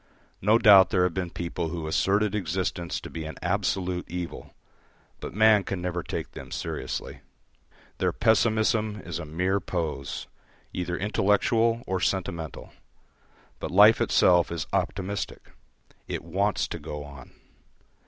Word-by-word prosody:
No 105 +4 +5
doubt 100 -5 +7
there 90 - +2
have 90 -2 +1
been 90 -1 -2
people 85 0 -4
who 85 -1 -4
asserted 100 +6 +1
existence 90 -2 -2
to - - -8
be 80 - -5
an 80 -2 -6
absolute 90 -1 -1
evil, 90 -1 -6 0.6
but - - -6
man 110 -1 +5
can 95 - -4
never 90 0 -2
take - - -5
them - - -10
seriously. - - -5 0.8
Their - - +2
pessimism 110 -1 +2
is 85 -1 -4
a 85 - -6
mere 90 +6 0
pose, 80 -7 -4 0.5
either 90 -1 -2
intellectual 110 +4 +2
or 95 0 -1
sentimental; 85 -5 -3 0.9
but - - -4
life 105 +4 +6
itself 90 -2 +4
is 85 -3 -3
optimistic: 95 +1 -3 0.6
it - - -4
wants 95 +4 0
to - - -5
go 75 0 -6
on. 70 -3 -12
90 Hz, 135 wpm, -26 LUFS, 85-105 Hz, 0.9 s, doubt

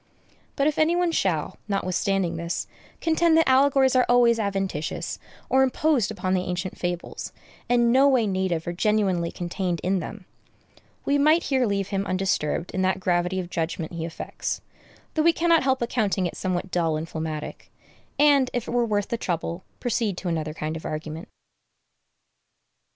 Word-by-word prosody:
But 275 - +1
if 300 -1 +1
any 320 +2 +3
one 350 -1 +2
shall, 170 - -1
notwithstanding 195 -2 0
this, 170 +1 -3 0.4
contend 325 0 +3
that 325 - +4
allegories 265 0 +4
are 255 - +4
always 240 -1 +5
adventitious, 195 -7 -2 0.3
or 265 - +3
imposed 265 - +2
upon 190 -3 -2
the 185 - +2
ancient 180 +1 -3
fables, 175 -1 -4 0.4
and 240 -1 +4
no 270 +2 +6
way 255 -4 +3
native 185 -4 -1
or 175 - -3
genuinely 190 -3 +1
contained 175 0 -3
in 185 +1 +1
them, 195 +3 -7 0.8
we 285 0 +2
might 310 +4 +4
here 260 -3 +1
leave 200 -1 -1
him 195 0 -2
undisturbed 185 -3 -1
in 185 - -2
that 190 0 +1
gravity 180 0 0
of 180 -1 -6
judgment 165 0 -3
he 165 -1 -4
affects 165 0 -4 0.5
(though 315 - +1
we 335 +2 +5
cannot 335 -1 +3
help 260 -2 +1
accounting 210 -6 0
it 175 - -3
somewhat 185 0 -2
dull 165 -3 +1
and 160 +1 -4
phlegmatic), 160 -2 -6 0.5
and, 285 -3 +5
if 245 -1 -2
it - - -4
were 240 -1 +1
worth 205 -2 0
the 235 - -1
trouble, 170 -3 -3 0.2
proceed 225 -5 -1
to 185 - -5
another 155 -2 -2
kind 155 0 -3
of 160 - -7
argument. 155 +4 -5
195 Hz, 165 wpm, -25 LUFS, 175-255 Hz, 0.8 s, no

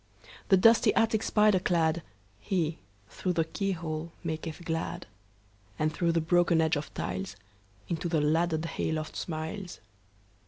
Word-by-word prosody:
The 190 - +7
dusty 225 +5 +6
attic 225 -1 +3
spider 210 -3 +4
cladHe, 160 - -1 0.3
through 185 - -2
the 165 -2 +1
keyhole, 170 -3 -3
maketh 160 +1 -5
glad; 165 0 -3 0.7
And 155 0 0
through 170 -1 +1
the 165 - +3
broken 170 0 +3
edge 160 +1 +3
of 145 0 -4
tiles, 95 +1 -4 0.5
Into 170 +1 -2
the 165 -2 +2
laddered 160 +2 +1
hay 165 -1 -2
loft 155 0 -3
smiles. 175 +3 -5
165 Hz, 130 wpm, -29 LUFS, 155-175 Hz, 0.7 s, The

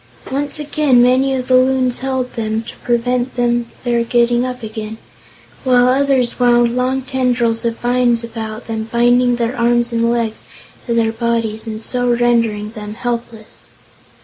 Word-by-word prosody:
Once 280 +2 -1
down, 295 -3 +2
many 260 +2 +3
of 255 -1 -4
the 255 - +4
Loons 255 -1 +2
held 260 -1 -2
them, 220 -1 -2
to - - -9
prevent 245 +1 -1 0.5
their 240 -1 +1
getting 240 +1 +2
up 250 -1 -5
again, 220 0 -6 0.7
while 250 -1 +4
others 260 -2 +1
wound 240 -1 +3
long 260 +1 0
tendrils 245 -3 0
of 230 0 -1
vines 240 -1 +1
about 225 -1 -6
them, 220 -1 -4
binding 245 +1 +3
their 235 +1 -2
arms 240 0 +1
and 230 0 +1
legs 230 -2 -2 0.4
to 235 - 0
their 225 -1 +2
bodies 230 -1 -2
and 220 0 -5
so 245 +1 0
rendering 230 -3 +1
them 210 -2 -8
helpless. 235 -2 -6
240 Hz, 150 wpm, -17 LUFS, 230-250 Hz, 0.7 s, the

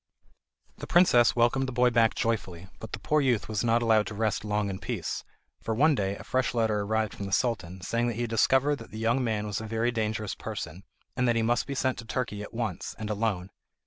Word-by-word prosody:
The - - -6
princess 150 -10 +5
welcomed 120 +3 +2
the - - -3
boy 125 0 +3
back 115 -1 +3
joyfully, 95 -6 -2
but 110 - -9
the - - -2
poor 150 +7 +2
youth 125 -6 +1
was 110 0 -1
not 120 0 +2
allowed 110 -2 +3
to 105 - -6
rest 110 -2 0
long 105 -1 0
in 95 - -5
peace, - - -4 0.4
for 110 - -2
one 155 +6 +4
day 100 -6 -1
a - - -10
fresh 130 -1 0
letter 110 -2 +1
arrived 110 +1 0
from 100 - -5
the - - -7
Sultan, 95 -6 -1
saying 115 +5 0
that 120 - -2
he 120 - -3
had 120 - -1
discovered 135 +5 +3
that - - -11
the 110 - -9
young 115 +4 +1
man 110 -3 -1
was 105 0 -3
a 110 - -6
very 115 +2 0
dangerous 110 -3 -2
person, 90 +5 -6 0.3
and 125 0 +1
that 120 - +3
he 115 - +2
must 120 +1 +1
be 140 - -3
sent 130 -2 0
to 115 - -8
Turkey 110 -3 -3
at 105 - -8
once, 115 -6 -4
and 110 -1 -4
alone. 100 -3 -1
115 Hz, 240 wpm, -28 LUFS, 105-120 Hz, 0.4 s, princess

